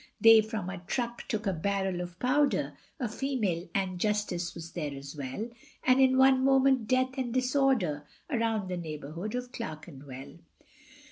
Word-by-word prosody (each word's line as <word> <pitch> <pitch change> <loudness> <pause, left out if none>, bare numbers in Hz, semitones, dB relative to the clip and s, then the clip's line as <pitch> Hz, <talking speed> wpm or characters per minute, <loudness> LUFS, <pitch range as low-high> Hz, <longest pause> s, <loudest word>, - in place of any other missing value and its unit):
They 225 -1 +8
from 215 -4 -4
a 190 0 -5
truck 235 +6 -3
took 220 -4 -2
a 195 - +1
barrel 190 +1 -1
of 175 -1 -7
powder, 275 +6 +1 0.2
A 250 - 0
female, 215 -8 -2
Ann 185 -2 -1
Justice 205 -4 -1
was 170 0 -8
there 150 -5 -4
as 140 +2 -8
well, 140 - -4 0.4
And 255 +1 +5
in 260 0 +5
one 265 0 +5
moment 265 -3 +4
death 255 +1 +1
and 245 -2 -2
disorder 255 - +1 0.2
Around 225 -7 0
the 180 - -2
neighbourhood 165 - -5
of 250 0 -4
Clerkenwell. 145 - -8
210 Hz, 155 wpm, -30 LUFS, 170-255 Hz, 0.4 s, They